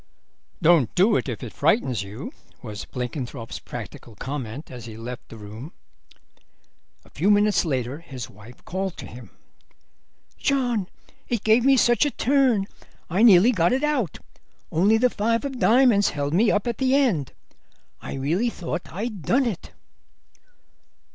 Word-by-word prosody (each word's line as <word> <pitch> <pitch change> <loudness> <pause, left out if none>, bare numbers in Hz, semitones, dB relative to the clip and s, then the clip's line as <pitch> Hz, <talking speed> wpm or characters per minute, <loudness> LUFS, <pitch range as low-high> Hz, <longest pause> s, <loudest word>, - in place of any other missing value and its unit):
"Don't 160 -8 +4
do 205 +5 +4
it - - -1
if 120 - -5
it 120 - -7
frightens 140 - +1
you," 105 - -7 0.3
was 105 -3 -7
Blenkinthrope's 125 -1 -5
practical 115 - -9
comment 130 - -6
as 120 -3 -9
he 110 -2 -9
left 120 +2 -8
the 115 - -10
room. 110 - -10 1.3
A - - -19
few 185 +7 0
minutes 205 -1 +3
later 130 -2 -2
his 135 -8 -8
wife 105 +5 -16
called 190 0 -3
to - - -8
him. 120 -3 -11 1.1
"John, 245 -8 0 0.4
it 235 -4 -1
gave 220 +2 +4
me 270 0 +5
such 240 0 +4
a 295 - +2
turn, 255 -5 +2 0.5
I 185 +5 +1
nearly 220 0 +7
got 175 -2 +2
it 265 +3 0
out. 285 - 0 0.5
Only 200 +7 +4
the 250 +2 +3
five 230 +5 0
of 270 -3 -5
diamonds 235 -4 +4
held 145 0 -3
me 210 +6 +4
up 205 - +1
at 235 -2 -3
the 265 0 +3
end. 220 - +1 0.7
I - - -6
really 165 - 0
thought 175 -4 -5
I'd 210 +2 -5
done 255 - +2
it." 210 -7 -4
185 Hz, 155 wpm, -24 LUFS, -, 1.3 s, nearly